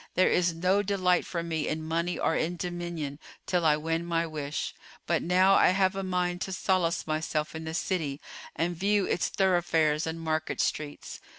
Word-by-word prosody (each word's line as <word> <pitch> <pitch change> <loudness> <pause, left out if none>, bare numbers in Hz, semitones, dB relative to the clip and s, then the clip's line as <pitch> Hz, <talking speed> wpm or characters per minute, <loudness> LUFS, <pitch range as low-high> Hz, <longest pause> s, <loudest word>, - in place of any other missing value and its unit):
There 185 - +4
is 175 -2 +2
no 185 +4 +2
delight 185 -3 +1
for 170 -2 -3
me 160 -2 -2
in 155 +1 -2
money 170 +1 -1
or 160 - +1
in 170 +2 0
dominion 175 -5 -4 0.3
till 180 -2 +1
I 150 -2 +4
win 165 +2 -1
my 170 -1 0
wish: 150 -2 -4 0.3
but - - +1
now 185 +2 +4
I - - +6
have 190 +1 +2
a 195 - -2
mind 180 -1 -1
to 190 - -3
solace 185 -2 +1
myself 155 -1 -2
in 160 0 -6
the 160 0 -4
city 160 -6 -1 0.4
and 170 +3 -1
view 200 +3 +2
its - - 0
thoroughfares 165 -5 +2
and 160 +1 -4
market 160 -1 -2
streets." 150 -1 -3
170 Hz, 185 wpm, -28 LUFS, 160-180 Hz, 0.4 s, I